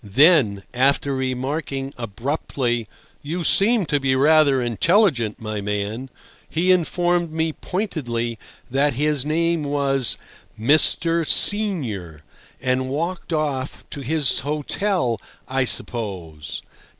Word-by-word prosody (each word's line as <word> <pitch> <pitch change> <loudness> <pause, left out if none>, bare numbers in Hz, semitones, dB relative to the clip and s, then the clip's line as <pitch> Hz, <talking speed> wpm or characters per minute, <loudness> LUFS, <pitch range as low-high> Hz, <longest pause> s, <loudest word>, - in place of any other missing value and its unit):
Then, 110 - +4
after 140 +2 +2
remarking 135 +1 -3
abruptly, 120 0 -3 0.3
"You 170 +4 -4
seem 210 +3 +3
to 145 -2 0
be 135 -1 +1
rather 145 0 +4
intelligent, 120 - +2
my 110 -2 -4
man," 105 +5 -3 0.4
he 180 +3 +2
informed 175 -1 +1
me 160 0 -1
pointedly 120 - -3 0.3
that 140 +2 +2
his 145 +1 0
name 165 +1 +1
was 140 -3 +1 0.4
Mr. 160 +6 +4
Senior, 120 - +1 0.4
and 130 0 -1
walked 170 +6 -3
off—to 145 -2 -3
his 145 0 +1
hotel, 150 - -1 0.3
I 130 0 0
suppose. 95 -8 -2
140 Hz, 100 wpm, -22 LUFS, 120-160 Hz, 0.4 s, Then